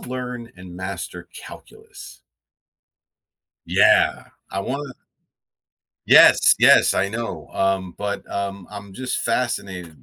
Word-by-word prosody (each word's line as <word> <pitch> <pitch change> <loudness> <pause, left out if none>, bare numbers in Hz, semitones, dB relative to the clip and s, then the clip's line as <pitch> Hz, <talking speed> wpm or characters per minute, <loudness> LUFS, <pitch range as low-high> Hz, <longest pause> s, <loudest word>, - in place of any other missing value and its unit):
learn 125 -2 -7
and 90 -1 -12
master 90 -2 -7
calculus. - - -13 1.5
Yeah! - - +2 0.2
I 95 - -3
wanna 135 +3 -5 1.1
Yes, - - +6
yes, - - +5
I 100 +1 0
know, 115 +2 -6
um, 95 -2 -1
but, 100 0 -5
um, 100 -2 -5
I'm 100 -1 -10
just 130 +4 -4
fascinated 95 - -4
100 Hz, 100 wpm, -21 LUFS, 95-120 Hz, 1.5 s, Yes